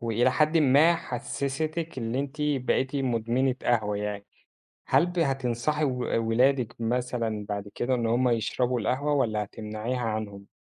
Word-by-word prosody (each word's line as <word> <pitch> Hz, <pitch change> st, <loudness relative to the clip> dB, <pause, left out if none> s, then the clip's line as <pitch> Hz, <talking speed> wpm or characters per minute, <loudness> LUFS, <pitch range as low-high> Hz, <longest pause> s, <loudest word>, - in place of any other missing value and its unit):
وإلى 115 Hz, +2 st, +2 dB
حدٍ 155 Hz, +2 st, +3 dB
ما 150 Hz, +4 st, +5 dB
حسّستِك 155 Hz, +4 st, -3 dB
اللي 115 Hz, +3 st, -1 dB
أنتِ 140 Hz, +1 st, -5 dB
بقيتِ 135 Hz, -1 st, 0 dB
مُدمنة 125 Hz, 0 st, +1 dB
قهوة 105 Hz, -4 st, +1 dB
يعني، 105 Hz, -1 st, -4 dB, 0.6 s
هل 170 Hz, -, +4 dB
ب 175 Hz, 0 st, -5 dB
هتنصحي 135 Hz, +1 st, 0 dB
و 130 Hz, -3 st, -1 dB, 0.3 s
ولادِك 125 Hz, +1 st, +2 dB
مثلًا 115 Hz, -3 st, -1 dB
بعد 100 Hz, 0 st, -4 dB
كده 130 Hz, +1 st, 0 dB
إن 120 Hz, -2 st, 0 dB
هم 120 Hz, +3 st, +2 dB
يشربوا 120 Hz, +2 st, 0 dB
القهوة 135 Hz, +7 st, 0 dB
والّا 110 Hz, -7 st, +1 dB
هتمنعيها 110 Hz, +4 st, -4 dB
عنهم؟ 110 Hz, -3 st, -4 dB
125 Hz, 140 wpm, -27 LUFS, 115-140 Hz, 0.6 s, ما